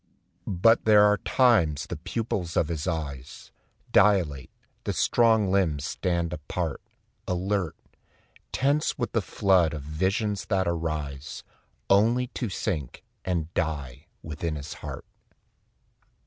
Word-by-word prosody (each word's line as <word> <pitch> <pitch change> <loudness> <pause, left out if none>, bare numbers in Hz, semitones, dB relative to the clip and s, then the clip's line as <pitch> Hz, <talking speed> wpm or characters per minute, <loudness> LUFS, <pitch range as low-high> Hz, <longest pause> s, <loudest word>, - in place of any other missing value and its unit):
But 115 +6 +3
there 105 -1 +7
are 105 0 +5
times 100 - +3
the - - -5
pupils 100 -7 -3
of 75 - +2
his 80 -3 -3
eyes 70 -5 -5 0.4
Dilate, 85 -11 +3 0.3
the - - -2
strong 110 -5 +3
limbs 85 -8 +1
stand 85 -2 -1
alert, 75 -3 -4 0.5
apart, 90 -1 -1 0.8
Tense 145 +3 +1
with 120 -4 -2
the 115 - +1
flood 90 -5 +2
of 75 - -6
visions 95 +7 -1
that 95 -3 0
arise 75 -3 -3 0.4
Only 115 +6 +4
to 120 -4 -4
sink 80 - -4 0.2
and 85 -2 -2
die 70 -5 -3 0.2
within 80 +1 -4
his 75 0 -6
heart. - - -7
90 Hz, 120 wpm, -26 LUFS, 75-105 Hz, 0.8 s, there